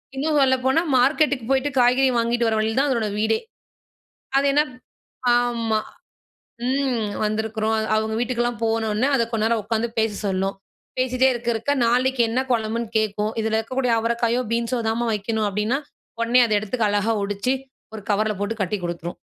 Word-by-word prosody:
இன்னும் 300 +3 0
சொல்லப்போனா, 265 +3 +3 0.2
மார்க்கெட்‌க்கு 275 -1 +2
போய்ட்டு 270 +2 +2
காய்கறி 250 +2 +4
வாங்கிட்டு 235 0 +1
வர 220 - +1
வழில 220 +2 -1
தான் 280 - +2
அதனோட 230 -5 0
வீடே. 220 +1 +2 1.0
அது 280 - +2
என்ன 295 +1 +4
ப் 255 - -16 0.6
ஆமா. 235 -2 0 0.9
ம். 255 -5 0 0.2
வந்திருக்கிறோம். 220 +1 -1
அ - - 0
அவுங்க 220 0 0
வீட்டுக்கெல்லாம் 240 -1 -1
போன 225 0 0
உடன, 245 +7 +1
அது 235 - +2
கொஞ்நேரம் 225 0 +1
உட்காந்து 225 +2 -1
பேச 220 0 +2 0.2
சொல்லும். 195 0 -1 0.4
பேசிட்டே 255 0 +2
இருக்க 240 0 -3
இருக்க 225 +6 -1
நாளைக்கு 250 +2 +2
என்ன 235 +3 0
கொழம்புன்னு 230 0 -1
கேட்கும். 215 0 -1
"இதுல 220 0 0
இருக்கக்கூடிய 250 +2 -1
அவரைக்காயோ, 235 +1 0
பீன்ஸோ 235 +2 0
தாம்மா 235 +2 -1
வைக்கணும்" 215 +1 -1
அப்பிடீன்னா, 210 +6 0 0.4
உடனே 235 +2 +4
அத 215 -2 +2
எடுத்துக்கு 215 +2 -1
அழகா 205 +2 +1
ஒடிச்சு, 205 +5 -1 0.4
ஒரு 215 - -7
கவர்ல 215 +1 +1
போட்டு 205 +3 -2
கட்டி 195 +2 -1
குடுத்துரும். 170 0 -5
230 Hz, 160 wpm, -22 LUFS, 215-250 Hz, 1.0 s, காய்கறி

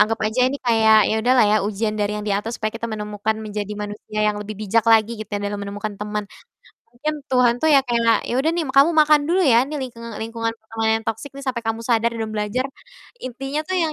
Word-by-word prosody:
anggap 220 +2 +3
aja 220 +4 -1
ini 280 - -3
kayak, 220 -2 +5
ya - - +1
udah 245 +3 +2
lah 245 - +6
ya 215 - +5
ujian 215 +1 -2
dari 205 0 0
yang 210 - -5
Di - - +1
Atas 220 +4 -2
supaya 215 0 -3
kita 230 0 -4
menemukan 210 0 -3
menjadi 210 -1 -4
manusia 210 +1 -6
yang 210 - -1
lebih 210 0 -7
bijak 215 +1 +1
lagi 225 0 +5
gitu 215 - -7
ya, 205 - -2
dalam 205 0 -3
menemukan 205 +1 -5
teman. 210 0 -3 0.7
Mungkin 290 +6 -3 0.2
Tuhan 250 -2 +4
tuh 315 - +4
ya 275 - +7
kayak, 230 -1 +2
"Ya - - -1
udah 300 +5 +2
nih 345 - -1
m - - -2
kamu 280 +4 +7
makan 305 -1 +5
dulu 345 +5 +1
ya, 245 -9 +5
nih 295 +2 -5
lingkungan 235 -3 -7
lingkungan 230 0 -3
pertemanan 220 0 -1
yang - - -17
toksik 225 +6 -4
nih, 275 - -9
sampai 250 -3 -2
kamu 225 0 -2
sadar 235 -1 +2
dan 225 -1 -4
belajar." 215 +4 -2 0.6
Intinya 270 +4 -4
tuh 375 +3 -2
yang 320 -2 0
225 Hz, 235 wpm, -21 LUFS, 215-255 Hz, 0.7 s, ya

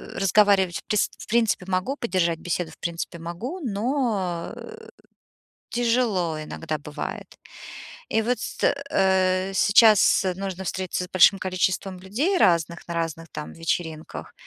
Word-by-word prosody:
разговаривать 195 -2 +3
в - - -9
прист 210 - 0
в - - -10
принципе 225 -4 +1
могу, 190 +9 -1
поддержать 175 - 0
беседу, 175 -2 -3
в - - -17
принципе 170 0 -4
могу, 175 - -6
но, 210 -6 -1
э, 445 0 -11 0.8
тяжело 230 -10 0
иногда 155 0 -4
бывает. 150 +1 -6 0.8
И 220 - +2
вот 240 +3 -1
ст - - -6 0.3
э, 190 -1 +2
сейчас 210 0 +5
нужно 190 -1 -5
встретиться 185 0 -3
с 180 - -18
большим 185 +2 +5
количеством 185 0 -1
людей 265 - 0
разных 170 - +2
на 170 - -3
разных, 165 -1 -3
там, 150 - -7
вечеринках. 165 -1 -4
185 Hz, 135 wpm, -24 LUFS, 170-215 Hz, 0.8 s, сейчас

